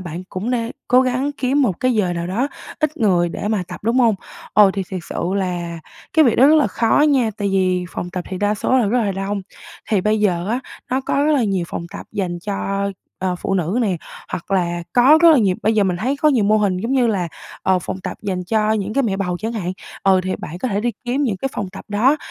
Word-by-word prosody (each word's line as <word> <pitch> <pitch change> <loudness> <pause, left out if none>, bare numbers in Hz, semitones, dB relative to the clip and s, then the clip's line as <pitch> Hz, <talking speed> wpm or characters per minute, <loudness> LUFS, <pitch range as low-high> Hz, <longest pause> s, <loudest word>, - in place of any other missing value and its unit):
bạn 175 0 -6
cũng 200 +6 -4
nê 235 -1 -1 0.2
cố 250 +1 +6
gắng 260 +3 0
kiếm 275 +1 +1
một 195 -9 0
cái 255 -1 +2
giờ 185 -5 +1
nào 170 0 -3
đó 230 +10 -1 0.3
ít 305 +1 0
người 180 -7 +2
để 205 - -4
mà 210 -4 0
tập, 180 - -8
đúng 230 +4 +1
hông? 230 -4 +4 0.4
Ồ, 205 -2 +6
thì 195 0 -2
thiệt 185 - -3
sự - - -3
là 175 -3 -2 0.3
cái 315 -1 +5
việc 235 - +3
đó 265 - +7
rất 310 +1 +6
là 295 - +4
khó 230 +3 +2
nha, 255 -6 +2
tại 205 -1 -1
vì 185 -2 +1
phòng 175 - -5
tập 180 0 -4
thì 185 - -4
đa 205 +2 +1
số 255 +5 +1
là 230 - +2
rất 245 +5 +2
là 200 -2 0
đông. 195 +1 -3 0.5
Thì 205 - +3
bây 215 +2 +1
giờ 180 -2 +1
á, 240 +3 0 0.3
nó 260 - +1
có 280 +2 0
rất 305 - +3
là 260 -6 +3
nhiều 195 -4 0
phòng 170 - -5
tập - - -8
dành 180 -3 -2
cho, 200 +1 -2 0.3
ờ, 185 -1 -1
phụ 195 - -2
nữ 185 +6 0
nè, 190 -5 +1 0.3
hoặc 170 - -6
là 175 -3 0
có 265 +6 +6
rất 335 - +9
là 295 - +5
nhiều 195 -5 +2
bây 220 +1 +2
giờ 205 -2 +3
mình 180 -2 0
thấy 260 +9 -1
có 305 +2 +3
nhiều 245 -8 +3
mô 215 +1 +4
hình 200 -3 +1
giống 230 +8 -2
như 255 -3 +3
là, 190 -6 0 0.3
ờ, 190 -1 +3
phòng 190 - -5
tập - - -5
dành 185 -3 -2
cho 215 +2 +1
những 210 -1 -2
cái 275 - +3
mẹ 200 -6 0
bầu 180 -3 -1
chẳng 225 +4 -3
hạn, 185 -5 -3 0.3
ờ, 190 -1 +4
thì 185 - -1
bạn 170 +3 -7
có 255 - -2
thể 200 -1 -1
đi 240 +2 0
kiếm 260 +4 0
những 220 -8 0
cái 270 - -2
phòng 195 - -3
tập - - -10
đó. 240 +8 +3
205 Hz, 265 wpm, -20 LUFS, 185-245 Hz, 0.5 s, rất